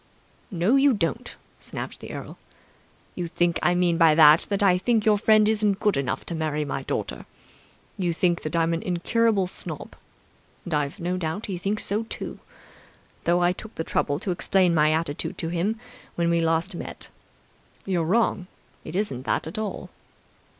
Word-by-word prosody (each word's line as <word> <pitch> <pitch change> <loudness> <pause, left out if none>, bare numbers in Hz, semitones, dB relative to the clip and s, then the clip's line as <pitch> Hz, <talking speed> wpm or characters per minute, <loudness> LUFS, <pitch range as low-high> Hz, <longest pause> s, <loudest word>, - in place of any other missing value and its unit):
"No 195 +6 +2
you 275 0 +5
don't," 205 +4 -2 0.2
snapped - - -7
the - - -9
earl. - - -8 0.7
"You 175 -2 -4
think 175 0 0
I 175 - +3
mean 175 -1 +2
by 160 -2 +6
that 155 0 +7
that 200 0 0
I 180 -2 +4
think 225 +1 +1
your 210 -2 +4
friend 215 0 +5
isn't 210 -2 +1
good 210 -2 +2
enough 135 -2 -2
to - - -3
marry 155 -2 -1
my 135 -1 -3
daughter. - - -4 0.7
You 175 -2 +1
think 170 +1 +1
that 155 +1 -3
I'm 165 0 +2
an 165 - -2
incurable 200 +3 +1
snob. 180 - -7 0.7
And 175 - -4
I've 145 -2 -1
no 180 +2 -2
doubt 175 +4 -3
he 185 -4 -4
thinks 200 +3 -1
so, 205 +2 -1
too, - - -6 0.9
though 175 +1 +3
I 175 - +4
took 220 +4 -9
the 160 - -2
trouble 145 -2 0
to 190 - -2
explain 180 0 +2
my 155 -1 +4
attitude 160 -2 -2
to 165 - -3
him 185 +6 -1 0.4
when 170 0 +1
we 170 0 +2
last 165 +1 0
met. 170 - -8 0.8
You're 180 -4 0
wrong. 190 0 +1 0.4
It 160 - -7
isn't 135 -11 -2
that - - 0
at 160 +7 -5
all. 215 -2 -5
175 Hz, 180 wpm, -25 LUFS, 165-205 Hz, 0.9 s, that